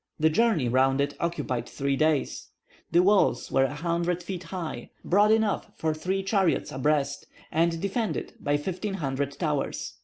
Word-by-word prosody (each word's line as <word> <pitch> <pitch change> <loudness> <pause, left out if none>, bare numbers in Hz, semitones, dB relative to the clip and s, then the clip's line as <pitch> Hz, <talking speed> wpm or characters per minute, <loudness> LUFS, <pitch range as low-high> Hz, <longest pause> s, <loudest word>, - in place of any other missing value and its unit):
The 160 +1 +4
journey 190 - +2
round 135 +2 +3
it 140 - 0
occupied 130 -8 -2
three 140 0 -1
days. 155 0 0 0.4
The 175 +2 +4
walls 195 - +3
were 135 0 +4
a 145 - -4
hundred 170 +2 -1
feet 180 -1 -6
high, 165 -8 -5 0.2
broad 205 +3 +4
enough 220 -2 +2
for 160 -1 -1
three 190 +5 -2
chariots 195 -3 +1
abreast, 140 +1 0 0.2
and 165 +1 +1
defended 205 +4 -2
by 145 0 +1
fifteen 190 +6 -3
hundred 140 -3 -2
towers. 150 -3 -2
165 Hz, 155 wpm, -27 LUFS, 140-190 Hz, 0.4 s, The